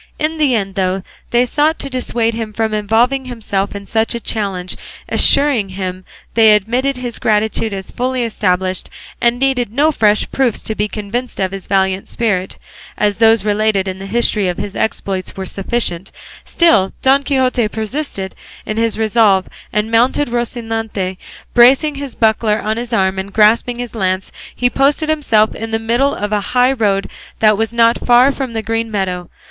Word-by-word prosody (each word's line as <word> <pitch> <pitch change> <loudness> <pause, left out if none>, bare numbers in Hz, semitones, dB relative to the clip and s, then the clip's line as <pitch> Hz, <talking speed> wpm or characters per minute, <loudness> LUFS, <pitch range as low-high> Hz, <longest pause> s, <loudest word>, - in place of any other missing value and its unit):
In 315 +1 -2
the 280 -5 +3
end, 195 -3 -2
though 185 0 -1 0.3
they 240 +1 +3
sought 300 +5 +1
to - - -5
dissuade 240 -3 -1
him 225 -1 -5
from 220 0 -1
involving 230 +6 +1
himself 205 -5 -3
in 200 0 -7
such 220 +3 0
a - - -3
challenge, 195 -6 -3 0.3
assuring 275 -9 +3
him 185 -1 -5 0.3
they 220 -2 +6
admitted 250 +6 0
his 245 -2 -5
gratitude 220 +1 0
as 195 -1 -6
fully 255 0 -1
established, 185 -4 -1 0.3
and 235 0 +2
needed 250 -4 0
no 290 +6 +2
fresh 210 -6 +2
proofs 260 -5 0
to 220 - -3
be 210 0 -1
convinced 220 +4 -4
of 190 -1 0
his 195 -1 -7
valiant 190 0 0
spirit, 200 -6 -1 0.4
as 205 -1 0
those 225 -2 +4
related 210 -2 +1
in 190 0 -4
the 195 - -7
history 210 -2 +1
of 180 - -2
his 205 -1 -5
exploits 195 -4 -3
were 190 - -4
sufficient, 195 -2 -2 0.3
still 330 - +3
Don 270 +1 +4
Quixote 260 -5 +1
persisted 220 -2 -4 0.3
in 215 - -4
his 230 -1 +1
resolve; 215 -4 +3 0.2
and 210 +1 -1
mounted 245 +4 +2
on - - -8
Rocinante, 225 -5 -3 0.4
bracing 265 +5 +5
his 280 -2 -6
buckler 220 -1 +2
on 215 +1 -2
his 240 0 -5
arm 190 -3 +1
and 195 +1 -5
grasping 220 +3 +3
his 245 -1 -6
lance, 185 -3 -1 0.2
he 245 - +1
posted 280 +5 +1
himself 230 -9 +2
in 225 0 -6
the 225 - 0
middle 235 +5 +1
of 205 0 -3
a 210 -1 +1 0.2
high 250 +1 +5
road 205 -6 0 0.3
that 215 -1 +4
was 225 +2 -1
not 235 0 +3
far 245 +3 +5
from 265 -3 -5
the 225 -1 -3
green 225 0 -2
meadow. 185 -4 -3
225 Hz, 175 wpm, -16 LUFS, 200-245 Hz, 0.4 s, they